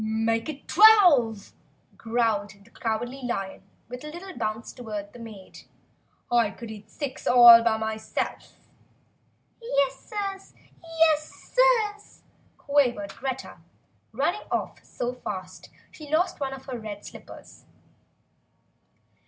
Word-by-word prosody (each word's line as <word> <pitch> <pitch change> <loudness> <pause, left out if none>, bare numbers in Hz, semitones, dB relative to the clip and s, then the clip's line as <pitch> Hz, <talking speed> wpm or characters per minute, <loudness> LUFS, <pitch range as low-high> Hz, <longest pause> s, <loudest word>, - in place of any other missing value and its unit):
"Make 225 +3 0
it 285 -2 -8
twelve!" 325 - +5 0.4
growled 225 -3 -1
the 230 - -22
Cowardly 240 +4 -3
Lion, 195 -6 -4 0.3
with 250 +2 -8
a - - -7
little 355 +5 -9
bounce 215 +1 -4
toward 210 -4 -7
the 245 - -12
maid. 215 -5 -11 0.7
"I 240 -1 +3
could 230 -2 -9
eat 210 -1 -11
six 275 0 -6
all 240 -2 +9
by 225 -1 +2
myself!" 220 0 -4 1.0
"Yes 280 - 0
Sirs! 395 -3 -6 0.4
Yes 310 -2 +1
Sirs!" 450 -5 +2 0.3
quavered 245 -9 +1
Greta, 265 -1 -5 0.5
running - - -2
off - - -3
so 245 0 -4
fast 185 -6 -8 0.2
she 300 -2 -12
lost 325 +4 +1
one 270 -2 -3
of 265 0 -10
her 255 -3 -6
red 205 -2 -8
slippers. - - -13
245 Hz, 120 wpm, -26 LUFS, 220-300 Hz, 1.0 s, all